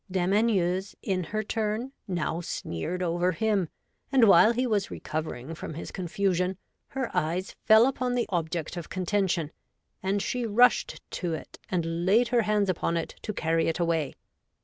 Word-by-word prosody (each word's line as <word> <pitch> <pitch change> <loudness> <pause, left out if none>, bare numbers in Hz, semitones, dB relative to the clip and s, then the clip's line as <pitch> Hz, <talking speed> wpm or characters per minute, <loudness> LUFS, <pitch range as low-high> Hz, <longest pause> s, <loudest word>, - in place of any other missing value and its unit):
Dame 185 0 +1
Anieuse, 195 -3 +1
in 185 -3 -1
her 215 +5 -2
turn, 220 +4 -2 0.2
now 175 -2 -1
sneered 170 - -4
over 175 +1 +1
him, 205 -3 +1 0.4
and 255 -5 +6
while 190 +3 +7
he 250 +2 0
was 210 -5 0
recovering 155 -2 -5
from 160 - -7
his 165 - -6
confusion, 185 0 0 0.3
her 265 -3 -4
eyes 175 +5 -1
fell 220 +1 +7
upon 255 -2 0
the 245 - +1
object 170 -2 -2
of 170 - -6
contention, 185 -3 0 0.5
and 195 +2 0
she 245 +4 -2
rushed 235 +3 +3
to 170 -3 -2
it, - - -10
and 170 -1 -1
laid 225 +6 +4
her 240 -1 +3
hands 210 -1 +1
upon 170 -2 0
it 165 - -2
to 215 - -3
carry 165 -4 +1
it 165 - -1
away. 165 -5 0
185 Hz, 165 wpm, -27 LUFS, 170-215 Hz, 0.5 s, while